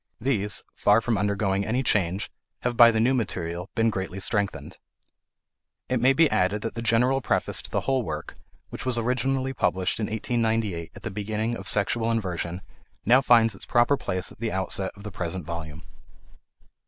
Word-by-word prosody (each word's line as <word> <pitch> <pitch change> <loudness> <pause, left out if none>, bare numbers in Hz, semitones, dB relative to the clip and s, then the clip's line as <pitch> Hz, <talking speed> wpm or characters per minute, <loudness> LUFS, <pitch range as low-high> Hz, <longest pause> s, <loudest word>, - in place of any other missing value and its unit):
These, 105 -5 +1
far 105 +2 +4
from 115 0 0
undergoing 100 -1 0
any 120 +5 -1
change, 95 -4 0 0.3
have 125 0 -1
by 120 0 +8
the 110 -1 +1
new 120 +4 +3
material 90 -6 -3
been 115 0 +2
greatly 95 -1 -4
strengthened. 100 +1 -2 1.1
It 130 -1 +1
may 130 +2 +5
be 160 +4 +4
added 95 +3 +1
that 115 - -3
the 115 - -5
General 125 +4 +2
Preface - - 0
to - - -11
the - - -1
whole 135 -1 +1
work, - - -6 0.3
which - - -7
was 130 -2 0
originally 130 +3 0
published 95 -7 0
in 105 - -1
1898 110 -6 -1
at - - -12
the 115 - -4
beginning 110 +3 -2
of 95 -2 -8
"Sexual 110 +3 +1
Inversion," 90 -5 -2 0.4
now 125 +5 +6
finds 115 -4 +5
its 95 - -10
proper 120 +3 +3
place 95 -8 -3
at - - -16
the 115 -1 -2
outset 95 0 -2
of 100 - -13
the 105 - -6
present 90 -3 -4
volume. 85 0 -6
110 Hz, 180 wpm, -25 LUFS, 95-120 Hz, 1.1 s, by